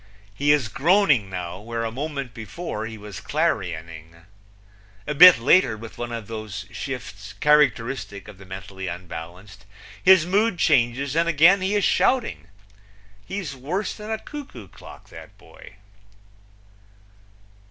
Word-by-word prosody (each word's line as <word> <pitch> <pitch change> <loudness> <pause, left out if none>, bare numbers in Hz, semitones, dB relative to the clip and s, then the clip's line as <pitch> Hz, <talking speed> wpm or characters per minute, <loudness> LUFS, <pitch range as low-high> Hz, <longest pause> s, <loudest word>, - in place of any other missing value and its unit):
He 145 +7 +2
is 145 -6 +2
groaning 140 - +2
now, 90 -1 -6
where 115 +2 -5
a 115 - -3
moment 140 -1 -5
before 110 - -6
he 110 -1 -9
was 105 -3 -9
clarioning. 85 - -3 0.9
A 150 - -2
bit 180 +5 +9
later, 115 -1 +3
with 115 +1 -11
one 120 0 -4
of 115 -2 -5
those 105 -2 -7
shifts 110 -6 -7
characteristic 125 -5 +1
of 105 -2 -13
the 95 - -13
mentally 95 0 -8
unbalanced, 90 +3 -9 0.4
his 185 -3 +6
mood 200 +2 +1
changes 130 +1 +1
and 170 +1 +2
again 170 +5 +5
he 190 +2 0
is 205 - +1
shouting. 90 - +1 0.8
He's 185 -8 -5
worse 165 +11 -3
than 210 0 -10
a 220 - -1
cuckoo 275 - -10
clock, - - -14
that - - -13
boy. - - -16
115 Hz, 135 wpm, -23 LUFS, 100-165 Hz, 0.9 s, bit